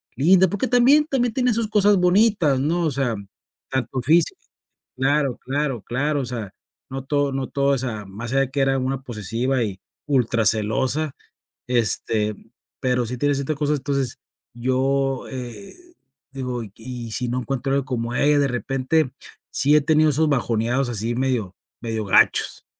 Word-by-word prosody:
linda, 180 +8 +5
porque 205 +8 -1
también 255 +5 +5
también 245 -6 0
tenía 250 -1 +1
sus 225 0 -1
cosas 205 -1 +4
bonitas, 180 - +3
¿no?, 165 +6 0
o 160 - +1
sea, 130 -4 -1 0.6
tanto 130 0 -2
físico 170 - +2 0.5
claro, 135 0 +1
claro, 135 -4 -2
claro, 145 +6 -1
o - - -3
sea, 115 -5 -5 0.4
no 135 0 -5
todo 145 0 0
no 135 -1 -3
todo, 140 0 0
o - - -2
sea, 115 -5 -3
más 110 +5 -7
allá 135 - +3
de 135 -1 -2
que 140 0 0
era 135 0 +2
una 130 +1 -2
posesiva 120 +3 -2
y 100 -4 -4 0.3
ultra 120 -5 +1
celosa, 130 +8 +1 0.5
este, 110 -3 +1 0.5
pero 125 -1 +1
sí 125 +2 -4
tiene 145 +2 +1
ciertas 140 +3 -2
cosas, 150 0 +1
entonces 135 -2 -2 0.3
yo, 130 +2 0
eh 130 - -6 0.6
digo: 125 -3 -4
"¿Y 105 - -11
y 120 -1 -7
si 120 +4 -1
no 125 +1 -1
encuentro 135 +1 -2
alguien 140 -1 0
como 120 -3 -3
ella?", 145 +2 +4
de 140 - +3
repente, 135 +3 0 0.4
sí 145 +2 +3
he 150 - +5
tenido 155 +1 +3
esos 155 +2 +2
bajoneados 120 0 0
así 115 +1 -2
medio, 125 -7 -1 0.3
medio 110 -2 -3
gachos. 95 - +3
135 Hz, 165 wpm, -22 LUFS, 120-150 Hz, 0.6 s, linda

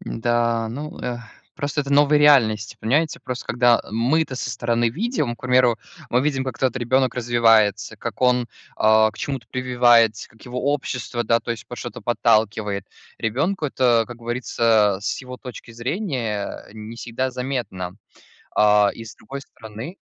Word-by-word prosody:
Да, 115 -1 0
ну, 145 +6 -7
э, 120 -1 -3 0.4
просто 145 -1 -2
это 140 0 -4
новая 145 +1 +5
реальность. 115 -7 +4
Понимаете, 150 +8 +1
просто, 125 -1 -6
когда 120 -1 +3
мы-то 130 +7 +1
со 130 0 -4
стороны 120 0 0
видим, 155 - -2
к - - -27
примеру, 125 -2 +3 0.3
мы 125 - +3
видим, 135 -2 0
как 130 -3 -5
тот 130 -1 0
ребенок 130 +1 +1
развивается, 115 -3 +3
как 120 - -6
он, 125 -2 +3 0.3
а, 110 0 +4
к - - -18
чему-то 135 -6 -4
прививается, 120 -3 +3
как 110 - -21
его 125 +3 -1
общество, 125 -4 -3
да, 115 - +3
то - - -6
есть 115 -2 -5
под - - -8
что-то - - -7
подталкивает. 110 -4 +1 0.3
Ребенку 145 - -1
это, 120 -4 +2
как 120 - -8
говорится, 115 -4 +1
с - - -2
его 125 -1 -9
точки 125 -3 -10
зрения 120 - -3
не 110 +1 -9
всегда 120 +3 -3
заметно. 120 -9 -4 0.6
А, 105 -1 +5
и 115 - -9
с 110 - -11
другой 140 +5 -8
стороны 115 - -9
120 Hz, 160 wpm, -22 LUFS, 115-130 Hz, 0.6 s, новая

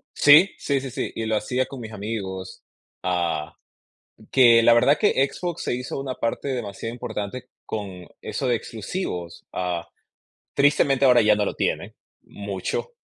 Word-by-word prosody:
Sí, 150 +7 +7
sí, 140 -2 -1
sí, 135 - -5
sí, - - -3
y 115 - -3
lo 110 0 0
hacía 125 +5 -1
con 135 - -9
mis 110 -2 -8
amigos, 100 -3 -5 0.4
ah, 85 -3 -1 0.8
que 120 -3 +6
la 120 - +6
verdad 140 +5 +4
que 140 -10 +3
Xbox 175 -2 -5
se - - -1
hizo 125 +2 -4
una 135 -1 -4
parte 115 +4 -2
demasiado 115 -3 -4
importante 120 +1 -5 0.2
con 95 -4 -6
eso - - -3
de 125 - +3
exclusivos. 100 - -5
Ah, 90 -2 -3 0.7
tristemente, 140 -1 +3
ahora 125 -2 +6
ya 105 0 +5
no 105 - +1
lo - - -3
tiene, - - -2 0.3
mucho, 100 - -5
115 Hz, 155 wpm, -24 LUFS, 100-135 Hz, 0.8 s, Sí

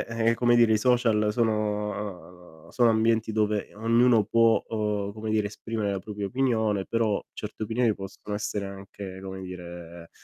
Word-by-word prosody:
eh, 115 0 +1
come 120 +1 +3
dire 120 -2 +5
i - - +4
social 115 -3 +2
sono 105 -5 -2 0.2
sono 120 -2 +3
ambienti 110 0 +2
dove 105 -1 0
ognuno 115 +1 +4
può, 115 0 +3
uhm, 105 -2 -2
come 110 +1 -6
dire 105 -1 +1
esprimere 110 0 -3
la 100 - -2
propria 105 +1 -5
opinione, 110 -4 0
però 115 -3 +1
certe 105 +1 -7
opinioni 115 0 +1
possono 95 +2 -8
essere 105 -1 -3
anche, 95 -1 -9
come 95 0 -6
dire, 85 -2 -9
105 Hz, 150 wpm, -27 LUFS, 100-115 Hz, 0.2 s, dire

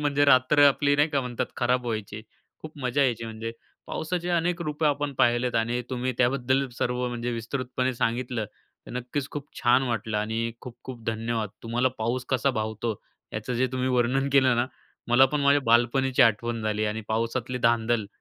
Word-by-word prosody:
म्हणजे 145 -1 +2
रात्र 140 +2 +5
आपली 145 +1 +2
नाही 145 +2 +3
का 145 -3 0
म्हणतात 125 -2 -3
खराब 125 0 +1
व्हायची. 110 -2 -4 0.4
खूप 155 -1 -10
मजा 130 +2 +1
यायची 120 -4 0
म्हणजे 115 0 -5 0.3
पावसाचे 175 +2 -3
अनेक 175 0 0
रूपं 150 0 -1
आपण 145 -1 0
पाहिलेत 120 0 +2
आणि 115 +2 +1
तुम्ही 130 0 -1
त्याबद्दल 130 +2 +2
सर्व 125 0 0
म्हणजे 120 0 -3
विस्तृतपणे 130 +2 -2
सांगितलं. 120 0 -1 0.4
तर - - -9
नक्कीच, 125 +3 -3
खूप 145 -1 -6
छान 125 +2 +4
वाटलं 110 -2 -2
आणि 110 +2 -1
खूप-खूप 125 -1 -10
धन्यवाद. 115 -1 -1
तुम्हाला 120 +3 +1
पाऊस 120 +3 -1
कसा 130 +1 +2
भावतो 110 -1 -2 0.4
याचं 105 +4 -4
जे 130 +2 +2
तुम्ही 130 0 0
वर्णन 130 +2 +1
केलं 130 -3 +5
ना, 120 - +1 0.4
मला 120 +2 +6
पण 145 +2 -2
माझ्या 140 +1 +4
बालपणीची 125 +3 +3
आठवण 115 0 +1
झाली 110 0 0
आणि 105 +1 -2
पावसातली 115 +3 -1
धांदल. 115 -2 +2
125 Hz, 170 wpm, -26 LUFS, 115-135 Hz, 0.4 s, मला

